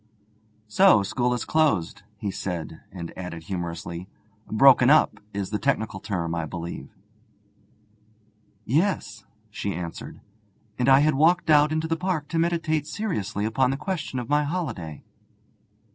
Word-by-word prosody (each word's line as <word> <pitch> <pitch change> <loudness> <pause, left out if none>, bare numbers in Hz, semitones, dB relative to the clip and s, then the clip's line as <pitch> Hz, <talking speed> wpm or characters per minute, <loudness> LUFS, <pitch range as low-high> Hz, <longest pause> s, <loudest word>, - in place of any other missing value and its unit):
'So 185 - +5
school 120 +5 0
is 125 - -2
closed,' 155 - +1 0.2
he 100 -1 -3
said, 85 -4 -5
and 85 -3 -8
added 90 -3 -7
humorously: 85 0 -5 0.4
'"Broken 130 +2 +6
up" 155 +1 +4
is 100 -1 -4
the 105 - -1
technical 110 -8 -1
term, 85 -5 -3
I 85 -1 -2
believe.' 85 +2 -6 1.8
'Yes,' 115 - 0 0.3
she 100 -2 -3
answered, 85 -1 -7 0.6
'and 125 - +2
I 135 +1 +7
had 155 +1 +3
walked 160 +4 +3
out 150 0 +5
into 155 +1 -1
the 165 - 0
park 175 -4 -2
to 165 - -1
meditate 165 -3 0
seriously 105 - -3
upon 125 +4 +2
the 135 - -1
question 160 -6 -4
of 120 -2 -4
my 150 +2 +2
holiday.' 130 - -4
120 Hz, 140 wpm, -25 LUFS, 95-155 Hz, 1.8 s, I